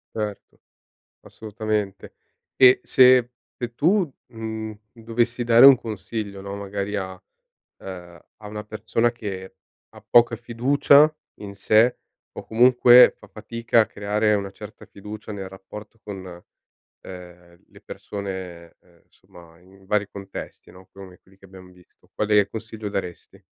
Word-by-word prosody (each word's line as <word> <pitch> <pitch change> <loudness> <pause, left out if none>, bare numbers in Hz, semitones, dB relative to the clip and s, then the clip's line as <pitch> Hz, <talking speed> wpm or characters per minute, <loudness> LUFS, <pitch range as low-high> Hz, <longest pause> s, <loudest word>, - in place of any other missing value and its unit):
Certo. 105 -2 -6 0.6
Assolutamente. 110 -2 -5 0.4
E 130 -1 +6
se 125 -1 +5 0.3
se 120 -1 -6
tu, 175 - +1 0.2
mhmm, 110 -1 -6 0.2
dovessi 115 +1 -2
dare 120 +2 +6
un 135 - +8
consiglio, 105 -2 -6
no, 100 0 -7
magari 100 0 -5
a 95 -1 -6 0.6
ehm, 90 -2 -10 0.2
a 105 - -13
una 105 0 -7
persona 110 +3 -1
che 95 -5 -8 0.3
ha - - -16
poca 120 -1 +4
fiducia 140 +6 +3 0.3
in 100 -1 -8
sé 110 +5 +3 0.3
o - - -10
comunque 125 +1 +6
fa - - -16
fatica 115 +2 -1
a 110 - +2
creare 105 +1 0
una 100 -1 -3
certa 105 +2 -12
fiducia 105 +1 -10
nel 95 -2 -7
rapporto 105 +4 -12
con, 95 -4 -9 0.6
ehm, 90 -1 -13
le - - -19
persone, 95 -4 -8
ehm, 85 -2 -27
insomma 85 -1 -19
in 95 +1 -21
vari 105 0 -1
contesti, 100 -1 -10
no, 95 0 -17
come 95 -2 -13
quelli 95 +1 -25
che 95 - -18
abbiam 95 -1 -15
visto, 90 -1 -25
quale 105 -1 +2
consiglio 110 -1 -7
daresti? 90 -4 -7
105 Hz, 135 wpm, -23 LUFS, 95-115 Hz, 0.6 s, un